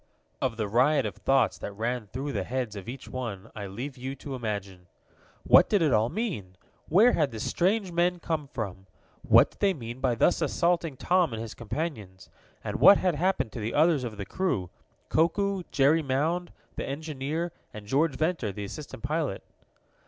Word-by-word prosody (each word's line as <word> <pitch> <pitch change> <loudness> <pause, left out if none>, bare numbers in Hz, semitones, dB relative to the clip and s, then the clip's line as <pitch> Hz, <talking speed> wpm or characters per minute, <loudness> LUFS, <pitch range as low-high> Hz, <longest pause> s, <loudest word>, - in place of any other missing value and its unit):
Of 125 -3 -1
the 110 -2 -1
riot 130 +8 +3
of - - -4
thoughts 120 -10 +2
that 100 - -6
ran 115 +2 -2
through 135 +7 -4
the 100 -6 -2
heads 125 -1 -3
of 100 +1 -7
each 130 +1 -8
one, 115 -7 -6
I 100 -2 -5
leave 125 +8 -6
you 130 +2 -4
to 140 0 -8
imagine. 100 -7 -5 0.6
What - - +6
did 205 -5 +3
it 150 - +3
all 110 +2 +3
mean? 150 - -4 0.3
Where 210 +9 +6
had 150 - +2
the 115 -3 -7
strange 190 - 0
men 175 +1 +1
come 160 -3 -2
from? 100 -8 -6 0.3
What - - +5
did - - -24
they 195 -2 +2
mean 120 -1 -7
by 130 -3 +1
thus 145 - +3
assaulting 170 -5 +1
Tom 175 -5 +2
and 110 - -4
his 115 -1 -6
companions? 110 - -5 0.3
And - - -3
what 200 - +8
had 180 -2 +1
happened 180 - 0
to 115 - -6
the 110 +1 -3
others 155 -3 +4
of 110 -4 -5
the 100 - -5
crew 105 - -2 0.4
Koku, 195 +4 +1
Jerry 150 +3 +3
Mound, 155 +6 -1 0.3
the - - -2
engineer, 155 +3 -3 0.2
and 105 -1 -9
George 140 +7 +1
Ventor, 155 - -1
the 100 +1 -6
assistant 125 +1 -8
pilot? 150 -10 -2
135 Hz, 185 wpm, -28 LUFS, 110-165 Hz, 0.6 s, what